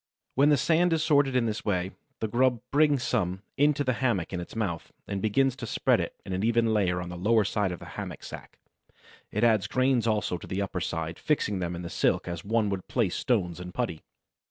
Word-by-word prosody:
When 140 +3 +4
the 145 - +5
sand 170 +5 +3
is 160 -1 +1
sorted 140 -4 +3
in 125 -2 +3
this 110 -1 -2
way, 95 -2 0 0.3
the 110 - 0
grub 120 +1 +2
brings 145 -3 +3
some 95 -5 -1
into 145 0 +3
the 130 -2 +1
hammock 105 -9 0
in 90 - -2
its 85 - -8
mouth, 95 -7 -3 0.2
and 100 -1 -3
begins 130 +5 +2
to 115 - -6
spread - - +2
it - - -3
in 95 - -4
an 95 +2 -1
even 115 0 +2
layer 90 -4 +1
on 90 0 -5
the 90 - -6
lower 105 +5 +3
side 100 -1 0
of 90 - -4
the - - -11
hammock - - -7
sack; - - -10 0.7
it 105 - -1
adds 110 -4 +4
grains 130 -3 +2
also 105 -5 0
to - - -10
the 95 - -3
upper 95 -2 -2
side, 80 0 -3
fixing 105 -10 0
them 90 -1 -2
in 85 - -6
the - - -4
silk - - +1
as 85 -2 -4
one 110 +1 +1
would 95 -2 -4
place 115 -8 0
stones 90 -8 0
in 90 0 -7
putty. 115 -11 -2
110 Hz, 225 wpm, -28 LUFS, 90-130 Hz, 0.7 s, the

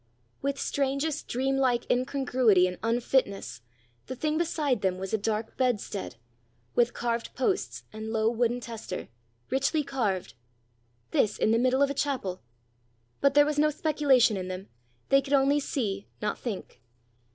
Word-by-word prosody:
With 275 0 -1
strangest 280 +2 -1
dream 270 +2 0
like 250 -3 +2
incongruity 250 -6 +3
and 180 0 -3
unfitness, 230 - 0 0.5
the 260 - -5
thing 305 +4 -1
beside 300 -8 0
them 185 -1 +1
was 190 +2 -5
a - - +4
dark 215 +1 -2
bedstead, 235 - -1 0.6
with 240 0 +2
carved 235 -1 -2
posts 375 +10 -1
and 220 0 -5
low 220 -1 +1
wooden 240 +1 +1
tester, 225 - -6 0.4
richly 275 +4 +1
carved! 215 - -2 0.8
This 210 -1 +2
in 215 - +2
the 225 - +3
middle 255 +2 +3
of 280 - +2
a - - -1
chapel! 260 -11 -2 0.8
But 280 0 +3
there 290 0 +7
was 295 0 0
no 305 +1 +5
speculation 280 -7 +3
in 185 -1 -4
them; 185 +1 -6 0.4
they 275 0 +5
could 275 +1 -4
only 280 +1 +4
see, 205 -8 -2
not 210 - -2
think. 215 - -6
245 Hz, 150 wpm, -28 LUFS, 215-275 Hz, 0.8 s, there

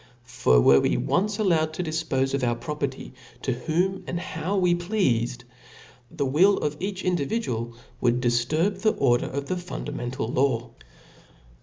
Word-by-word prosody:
For 120 - +3
were 70 +3 +6
it - - +1
once 205 +2 0
allowed 165 -7 +1
to 180 - -2
difpofe 155 -5 -1
of 140 -2 0
our 120 -1 +1
property 140 0 -5 0.3
to 130 - 0
whom 175 +9 -1
and 175 - -2
how 170 +4 -3
we 180 -2 +3
pleafed, 130 - 0 0.7
the 145 -1 -2
will 175 +10 +4
of 150 0 -2
each 190 0 -4
individual 140 - -1 0.3
would 120 0 +2
difturb 145 +11 +1
the 215 - +3
order 120 -3 +2
of 140 +1 -4
the 185 +5 -2
fundamental 135 -8 -5
law. 120 -2 0
145 Hz, 150 wpm, -25 LUFS, 120-180 Hz, 0.7 s, were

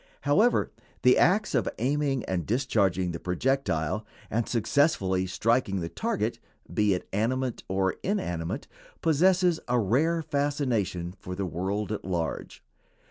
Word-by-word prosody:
However, 200 - +3 0.3
the 125 - +7
acts 200 +6 +3
of 120 - +1
aiming 135 +1 0
and 90 -4 -2
discharging 100 -7 +1
the 85 - -5
projectile, 100 - 0 0.3
and 115 +1 0
successfully 105 - +2
striking 105 +1 +1
the 85 -1 -3
target, 85 - -2 0.3
be 105 -2 +3
it 90 - -6
animate 125 +4 0
or 95 0 0
inanimate, 90 - -2 0.4
possess 175 +2 +3
a 125 0 +2
rare 155 - +2
fascination 130 - -1
for 90 - -6
the 100 +1 -2
world 95 +5 -2
at 110 - -3
large. 85 -3 -3
115 Hz, 130 wpm, -27 LUFS, 95-145 Hz, 0.4 s, the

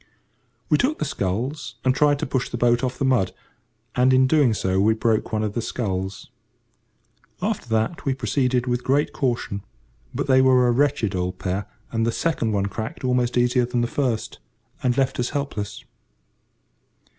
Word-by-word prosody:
We - - +3
took 285 +5 +1
the - - -2
sculls 130 +3 -3
and 130 - +4
tried 145 +1 +3
to - - -2
push 130 -1 -1
the 120 - -4
boat 120 +1 +2
off 130 0 -1
the 135 - 0
mud, 115 -9 +2 0.6
and, 125 +1 +3
in 130 0 +5
doing 130 -5 +3
so, 95 -1 0
we 110 +3 +4
broke 110 -1 0
one 110 -1 0
of 105 -1 -2
the 120 - -1
sculls. 95 -5 -4 1.1
After 200 - -2
that 110 +8 0
we 135 -2 0
proceeded 125 +1 0
with 125 -1 -1
great 140 +3 +1
caution, 120 -7 -1 0.5
but - - -2
they 130 -1 +5
were 130 -1 +5
a - - +4
wretched 135 -4 +1
old 90 0 -2
pair, 95 +2 -3 0.2
and 115 -1 0
the 115 - +1
second 135 -6 0
one 100 -2 +1
cracked 110 +5 -5
almost 125 -1 +1
easier 125 +1 +3
than 120 0 -1
the 120 - +1
first, 120 -4 -2 0.4
and 125 -1 +1
left 135 -1 +1
us 120 - 0
helpless. 125 -8 -4
125 Hz, 180 wpm, -23 LUFS, 110-130 Hz, 1.1 s, in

